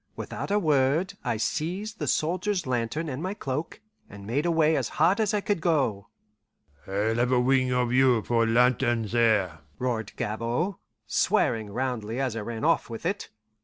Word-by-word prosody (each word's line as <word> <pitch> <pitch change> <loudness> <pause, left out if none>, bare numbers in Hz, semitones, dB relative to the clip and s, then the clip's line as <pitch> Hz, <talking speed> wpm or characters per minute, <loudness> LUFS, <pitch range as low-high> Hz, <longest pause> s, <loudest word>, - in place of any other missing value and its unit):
Without - - -5
a 205 - +2
word 155 +2 +2
I 120 -4 -1
seized 185 - -3
the - - -2
soldier's 180 +3 0
lantern 125 +6 -2
and 135 0 -4
my 190 +3 -3
cloak, 150 +2 -4 0.3
and 100 0 -11
made 140 +10 0
away 160 -2 +3
as - - -1
hard 195 +5 +4
as 215 -2 +2
I 210 - 0
could 200 -4 -1
go. 135 - 0 0.8
"I'll 105 +3 0
have 120 +1 +1
a 125 - +4
wing 130 0 +2
of 125 -1 +1
you 125 -4 +4
for 115 -1 +2
lantern 120 0 +3
there!" 105 -7 +1 0.2
roared 115 -4 -2
Gabord, 120 - -2 0.3
swearing 110 -2 +1
roundly 120 0 -3
as 130 -4 -1
I - - -2
ran 115 +2 -5
off 165 -5 +2
with 115 +6 -7
it. 200 +4 -2
130 Hz, 170 wpm, -26 LUFS, 115-165 Hz, 0.8 s, hard